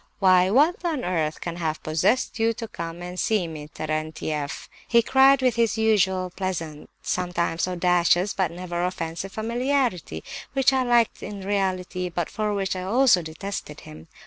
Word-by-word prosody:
"'Why, 185 -2 +5
what 300 - +3
on 315 -7 -1
earth 160 -4 -1
can 170 -1 -4
have 160 -2 -3
possessed 165 +10 +1
you 225 +1 +2
to 225 0 -6
come 170 -2 -7
and 180 +1 -6
see 210 -6 +1
me, 155 -2 -8
Terentieff?' 155 -1 -4 0.2
he 235 -1 +4
cried, 270 +2 +5
with 250 -2 +2
his 230 -1 +2
usual 190 -4 +2
pleasant, 165 -5 -4
sometimes 175 -2 -1
audacious, 180 +1 +2
but 190 -3 0
never 175 0 -4
offensive 180 +1 -3
familiarity, 235 - -1 0.3
which 270 0 +3
I 265 - +2
liked 240 -2 +2
in 200 -1 -7
reality, 185 -2 -1
but 175 -1 -3
for 215 -1 -1
which 195 -1 -1
I 185 - -4
also 220 +1 +4
detested 160 -1 -6
him. 80 +1 -12
185 Hz, 160 wpm, -24 LUFS, 170-225 Hz, 0.3 s, Why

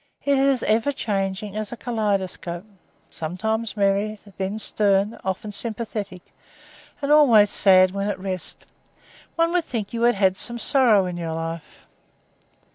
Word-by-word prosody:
It 280 0 +3
is 270 -2 +2
as - - -3
ever 225 +6 +2
changing 200 -4 -3
as 215 -1 -4
a 240 - -6
kaleidoscope 200 -6 -2 0.5
sometimes 220 +7 -2
merry, 200 +2 +1 0.2
then 195 +2 -2
stern, 205 0 +1
often 190 +3 -3
sympathetic, 205 -4 -4 0.8
and 280 - 0
always 235 -9 +6
sad 185 -2 +5
when 200 +1 -2
at 205 - -2
rest. 185 -2 -4 0.7
One 335 0 +2
would 355 -1 +2
think 220 -4 -4
you 230 - -3
had 240 +1 +4
had 190 -1 +2
some 235 +4 -3
sorrow 235 -6 +4
in 180 -1 -4
your 165 -2 -4
life." 165 0 -7
205 Hz, 145 wpm, -23 LUFS, 190-230 Hz, 0.8 s, always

